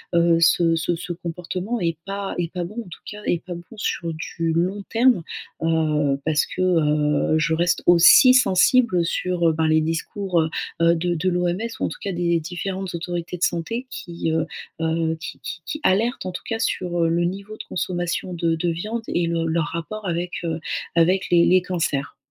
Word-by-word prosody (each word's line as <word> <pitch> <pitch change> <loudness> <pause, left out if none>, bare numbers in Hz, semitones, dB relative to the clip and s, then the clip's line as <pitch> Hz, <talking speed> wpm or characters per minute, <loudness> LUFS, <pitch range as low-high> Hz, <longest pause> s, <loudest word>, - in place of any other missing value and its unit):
heu, 170 0 +4
ce 165 0 +4
ce 170 +2 0
ce 175 +1 -6
comportement 180 +6 -4
est 165 -2 0
pas 195 0 -4
est 170 -1 -2
pas 180 - -2
bon, 185 +5 -8
en 225 -6 -7
tout - - -11
cas, 210 0 -9
est 170 - 0
pas 180 -2 -5
bon 175 +6 -11
sur 170 -4 -2
du 165 +1 -3
long 185 +4 0
terme. 235 -4 +3 0.4
Heu, 155 -3 +1
parce 150 -1 +2
que, 185 - -5
heu, 150 -3 +2
je 155 +1 +1
reste 175 +2 +1
aussi 175 -1 +8
sensible, 250 -2 +4
heu, - - +2
sur, 175 0 0
heu, - - +1
ben, 160 0 +1
les 155 0 +4
discours, 170 +3 -1
heu 160 - -1 0.3
heu, 170 0 +5
de 175 +1 -1
de 180 +4 0
l'OMS 180 +1 0 0.2
ou - - 0
en - - -1
tout - - -8
cas 200 - -3
des 170 -1 +1
différentes 185 +3 -4
autorités 175 +1 -4
de - - -4
santé 230 +10 -1
qui, 170 -5 -4
heu 160 0 +1 0.4
heu, 160 0 0
qui - - -7
qui 185 -4 -6
qui 305 - -4
alertent 225 +6 +1
en - - -3
tout 180 - -7
cas 225 -1 -2
sur, 175 -5 -1
heu, 165 - +2
le 170 +1 +1
niveau 200 +4 -5
de - - -7
consommation 175 0 -2
de 165 -1 +1
de 170 +2 -1
viande 210 +8 -3
et 175 - 0
le 165 -1 -1
leur 160 -1 0
rapport 190 +5 -5
avec, 175 +1 -2
heu, 165 0 -2 0.4
avec 180 +3 +3
les 170 -1 +6
les 185 0 +5
cancers. 165 -7 -2
175 Hz, 205 wpm, -23 LUFS, 165-185 Hz, 0.4 s, aussi